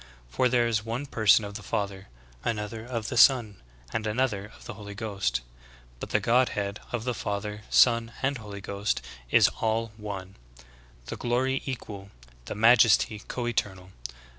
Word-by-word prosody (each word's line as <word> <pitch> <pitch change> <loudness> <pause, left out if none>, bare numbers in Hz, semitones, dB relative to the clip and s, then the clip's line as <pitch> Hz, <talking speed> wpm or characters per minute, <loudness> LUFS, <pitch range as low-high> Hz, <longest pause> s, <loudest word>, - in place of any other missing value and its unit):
For - - +2
there 120 -1 +3
is 110 -3 0
one 115 +5 -3
person 110 -5 +4
of 100 - -7
the 105 - -7
Father, 100 -1 -3 0.4
another 110 -1 -3
of 115 -2 -4
the - - -3
Son, 115 - +5 0.3
and 110 - -1
another 105 -3 0
of - - -16
the - - -6
Holy 100 -1 -9
Ghost. 100 - -2 0.6
But - - -6
the - - +2
Godhead 110 -4 +1
of 120 -3 -2
the 125 0 -1
Father, 105 -1 -4
Son, 115 -1 +4
and 135 -1 0
Holy 100 -2 -8
Ghost, 100 -8 -2 0.3
is - - +6
all 115 0 0
one: 100 -3 -7 0.7
the - - -6
glory 130 +2 0
equal, 100 -6 -6 0.4
the - - -5
majesty 115 -1 +5
co 125 - -3
eternal. 95 -5 -2
110 Hz, 160 wpm, -27 LUFS, 100-120 Hz, 0.7 s, is